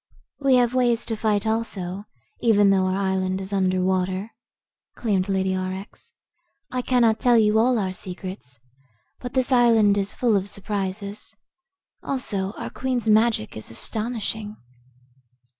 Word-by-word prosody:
"We 275 -2 +4
have 245 -1 +3
ways 240 -2 +2
to 225 - -1
fight, 210 -1 0
also, 205 -4 -2 0.3
even 205 -4 +4
though 190 -1 +2
our 185 +1 0
island 190 -1 0
is 195 +1 -6
under 185 -1 +1
water," 185 +3 -1 0.6
claimed 200 -4 0
Lady 190 -1 +1
Aurex. 185 +2 -6 0.6
"I 255 0 -1
cannot 235 -3 +2
tell 245 -2 +4
you 215 0 +4
all 245 +2 +3
our 190 -3 -1
secrets, 185 - -8 0.6
but 245 -1 -7
this 260 +1 +1
island 225 -5 +5
is 195 0 -2
full 235 -4 +1
of 195 0 0
surprises. 200 +1 -4 0.7
Also 205 -7 -2
our - - -6
Queen's 250 -3 -2
magic 220 - +2
is 110 - -5
astonishing." 215 - -3
205 Hz, 140 wpm, -24 LUFS, 190-230 Hz, 0.7 s, island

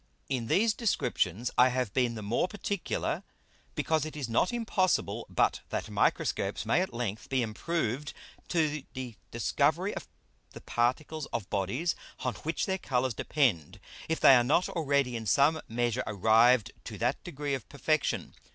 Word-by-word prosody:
In 125 -4 -1
these 215 - +3
Descriptions 120 - 0
I 125 +1 +7
have 125 -5 -1
been 125 -3 +1
the 110 - -6
more 115 - +1
particular, 200 -1 -2 0.5
because 160 -2 +1
it 155 0 -6
is 140 -4 -3
not 115 +10 +2
impossible 220 -6 0
but - - +1
that - - -3
Microscopes - - 0
may - - +3
at 190 - -2
length 115 -3 -4
be 130 -2 +1
improved 135 +3 -2 0.4
to 155 -4 0
the 125 -3 -5
discovery - - +1
of - - -7 0.5
the - - -10
Particles 140 +6 -1
of 115 -5 -5
Bodies 120 - 0 0.3
on 125 - -1
which 160 +2 -2
their 190 -1 -1
Colours 130 -5 0
depend, 100 - 0 0.3
if 160 - 0
they - - +8
are 125 -2 +6
not 155 +8 +2
already 140 -6 +1
in 110 -2 -4
some 150 +6 +4
measure 120 +1 0
arrived 110 +3 +4
to - - -7
that - - -1
degree 145 0 -4
of 135 - -4
perfection. 155 +1 -1
130 Hz, 160 wpm, -30 LUFS, 115-155 Hz, 0.5 s, they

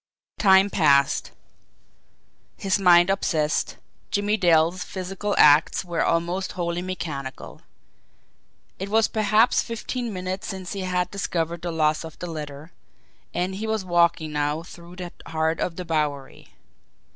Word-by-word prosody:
Time 195 0 +5
passed. 140 -4 +3 1.3
His 195 0 0
mind 175 -1 +6
obsessed, 155 -6 0 0.3
Jimmie 205 +1 +1
Dale's 170 -2 +3
physical 195 +2 -4
acts 150 +4 +5
were 170 -2 -1
almost 175 +3 -1
wholly 175 -1 -2
mechanical. 155 -7 -6 1.2
It 195 +1 -4
was 220 +1 +3
perhaps 215 +2 +3
fifteen 235 +1 -4
minutes 185 0 -4
since 190 -2 -6
he 200 - -5
had 180 -1 -1
discovered 170 -4 -2
the 175 - -3
loss 155 -1 +1
of 160 -1 -10
the - - -6
letter, 150 -1 -7 0.6
and 180 +2 -2
he 210 +3 -4
was 220 -3 -1
walking 170 -3 +2
now 150 +2 -1
through 170 +1 -13
the 180 -1 -7 0.2
heart 160 0 -1
of 170 - -2
the 180 - -6
Bowery. 150 -4 -3
175 Hz, 135 wpm, -24 LUFS, 160-190 Hz, 1.3 s, mind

